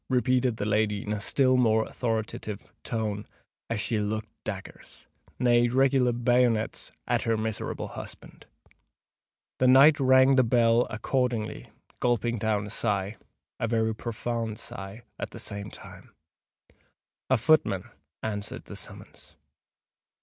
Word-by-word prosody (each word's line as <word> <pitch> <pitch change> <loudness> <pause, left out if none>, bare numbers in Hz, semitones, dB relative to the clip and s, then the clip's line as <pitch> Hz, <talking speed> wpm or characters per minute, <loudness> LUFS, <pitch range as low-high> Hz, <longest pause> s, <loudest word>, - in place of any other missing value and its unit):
repeated 125 -2 +2
the 100 - -2
lady 105 -1 +1
in 105 - -2
a 105 - -2
still 130 +4 +3
more 110 -3 +3
authoritative 110 -3 -3 0.2
tone, 105 -3 -3 0.4
as 115 -2 -1
she 110 0 0
looked 110 +1 -3
daggers—nay, 120 +4 -2
regular 130 0 +3
bayonets—at 120 -2 0
her 115 -1 +1
miserable 110 0 -3
husband. - - -10 1.1
The 130 - +4
knight 140 +4 +7
rang 130 0 +5
the 130 - +6
bell 115 0 +3
accordingly, 120 -1 -2 0.3
gulping 120 -1 +1
down 105 -1 0
a 105 - -8
sigh—a 105 +2 -3
very 110 -1 +1
profound 115 0 -3
sigh—at 100 +5 -8
the - - -11
same 100 0 -5
time. - - -13 1.1
A 130 - +4
footman 110 - +3 0.4
answered 105 -2 -4
the - - -9
summons. - - -10
115 Hz, 115 wpm, -27 LUFS, 105-125 Hz, 1.1 s, knight